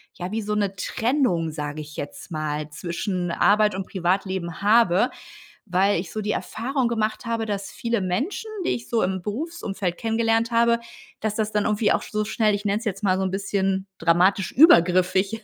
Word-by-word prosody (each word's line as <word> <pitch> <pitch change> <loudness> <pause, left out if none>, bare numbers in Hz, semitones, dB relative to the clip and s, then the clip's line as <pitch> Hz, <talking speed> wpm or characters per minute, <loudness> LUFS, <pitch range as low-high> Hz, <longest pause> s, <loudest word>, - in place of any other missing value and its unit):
ja, 180 0 -5
wie 225 +1 -1
so 210 0 -3
'ne 200 -2 0
Trennung, 195 - 0
sage 150 0 -5
ich 150 0 -11
jetzt 145 +5 -7
mal, 155 -1 -3
zwischen 175 +3 -3
Arbeit 210 +4 +3
und 190 0 -4
Privatleben 185 -1 -2
habe, 210 0 +4 0.6
weil 190 0 +2
ich 180 - -8
so 215 - -3
die 210 - -2
Erfahrung 250 +4 -1
gemacht 220 0 -1
habe, 230 -1 -1
dass 200 -2 -3
viele 235 -2 -2
Menschen, 210 - -2 0.2
die - - +1
ich 235 - -3
so 230 -2 +1
im 190 0 -1
Berufsumfeld 210 - -3
kennengelernt 225 0 +1
habe, 235 0 +3 0.4
dass 215 -1 -1
das 215 -1 -1
dann 210 -1 +1
irgendwie 210 0 +2
auch - - 0
sch - - -10
so 215 0 0
schnell, 215 -1 +1
ich 205 +1 -4
nenn's 205 +3 0
jetzt 200 -2 -3
mal 185 -2 +3
so 190 - 0
'n 190 - -1
bisschen 195 0 -1
dramatisch 180 +4 +2
übergriffig 185 - +5
200 Hz, 185 wpm, -24 LUFS, 180-225 Hz, 0.6 s, übergriffig